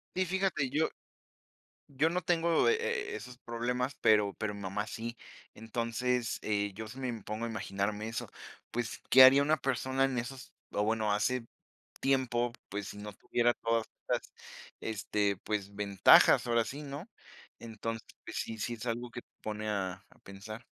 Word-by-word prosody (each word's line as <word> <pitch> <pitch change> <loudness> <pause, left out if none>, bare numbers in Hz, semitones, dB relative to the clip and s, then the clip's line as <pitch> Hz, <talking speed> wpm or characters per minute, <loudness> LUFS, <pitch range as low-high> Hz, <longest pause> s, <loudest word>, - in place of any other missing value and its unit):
Sí, 185 0 +2
fíjate, 185 -6 0
yo 155 +4 +1 1.0
yo 145 +3 +2
no 180 +2 -1
tengo 165 -4 +3
e 115 - +6
e - - -2
esos 120 +3 -8
problemas, 125 +2 -2
pero 105 -2 +4
pero 110 -1 -3
mi 100 - -8
mamá 100 +2 -2
sí. 115 +2 -5 0.4
Entonces, 115 +1 -1
eh, 105 -1 0
yo 110 +3 -6
si 125 +5 -9
me 130 - -2
impongo 110 -1 -4
a - - -2
imaginarme 105 0 -2
eso, 115 - -4 0.4
pues, 120 -1 -3
¿qué 130 - +10
haría 135 +2 +9
una 155 +2 +3
persona 130 0 0
en 135 -2 -1
esos, 130 +2 -5 0.2
o 105 - 0
bueno, 110 -1 +1
hace 115 +4 0 0.6
tiempo, 120 -3 +1 0.2
pues, 100 0 -4
si - - -8
no 105 0 -7
tuviera 120 +3 +1
todas 115 -1 0 0.2
estas, - - -1 0.5
este, 105 -2 0
pues, 100 -2 -2
ventajas? 100 +3 +6
Ahora 115 -1 +3
sí, 140 +6 -6
¿no?, 145 +6 -6 0.5
entonces, 115 0 -5 0.2
pues, - - -7
sí, 110 - -4
sí 120 +3 -2
es 115 +1 -8
algo 120 +1 -2
que 120 - -7
te - - -66
pone 110 0 -4
a 95 -3 -1 0.2
a - - -22
pensar. 110 +4 -9
115 Hz, 170 wpm, -32 LUFS, 105-130 Hz, 1.0 s, qué